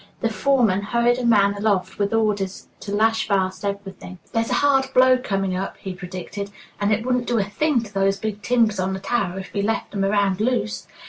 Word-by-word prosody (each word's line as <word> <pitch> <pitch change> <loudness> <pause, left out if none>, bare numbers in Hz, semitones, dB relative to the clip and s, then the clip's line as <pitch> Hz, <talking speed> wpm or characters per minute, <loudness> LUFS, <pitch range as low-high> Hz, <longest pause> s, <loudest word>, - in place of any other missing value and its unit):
The 230 - +1
foreman 225 -4 +2
hurried 235 +4 +1
a 245 - -2
man 200 -3 +4
aloft 200 -2 -1
with 200 0 +1
orders 210 -4 -1
to 200 - -7
lash 220 +2 +2
fast 190 -2 0
everything. 200 -2 -5 0.2
"There's 225 0 0
a - - +1
hard 270 -2 +3
blow 255 0 +6
coming 195 -6 -1
up," 190 +1 -4
he 190 - -6
predicted, 185 +3 -6 0.3
"and 205 +1 +1
it 220 +2 0
'wouldn't 250 -1 0
do 240 - +1
a 205 - +2
thing' 245 +5 0
to 210 -2 -11
those 195 0 +1
big 210 0 -4
timbers 225 -3 +2
on 190 +1 0
the 190 - -4
tower 190 -3 -1
if 190 - -8
we 200 - 0
left 215 +1 -2
'em 200 -1 -1
around 200 -1 +1
loose! 215 - -1
205 Hz, 210 wpm, -22 LUFS, 195-230 Hz, 0.3 s, blow